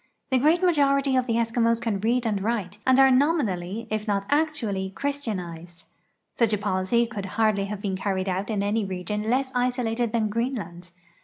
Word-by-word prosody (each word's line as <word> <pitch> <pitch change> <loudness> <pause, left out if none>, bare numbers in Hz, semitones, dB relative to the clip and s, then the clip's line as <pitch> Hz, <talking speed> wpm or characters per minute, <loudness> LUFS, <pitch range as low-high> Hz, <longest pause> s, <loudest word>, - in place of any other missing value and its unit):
The 260 - +4
great 320 +7 +3
majority 275 -5 +3
of 255 -1 +1
the 230 - 0
Eskimos 230 0 +1
can 225 -4 -2
read 235 +4 +1
and 210 -3 0
write 205 -2 -2
and 260 0 +5
are 270 0 +7
nominally, 230 - +1
if 215 0 -2
not 200 -1 0
actually, 270 -11 0
christianized. 185 -10 -5 0.5
Such 230 -3 +1
a - - +2
policy 200 +3 +1
could 215 -4 -6
hardl}^ 215 -3 +2
have 205 0 -5
been 195 -2 -1
carried 190 -1 -2
out 190 +3 -2
in 205 -2 -1
any 210 +2 0
region 195 +3 -3
less 260 +2 +1
isolated 245 -2 0
than 220 -2 0
Greenland. 205 -7 -4
225 Hz, 175 wpm, -25 LUFS, 195-250 Hz, 0.5 s, are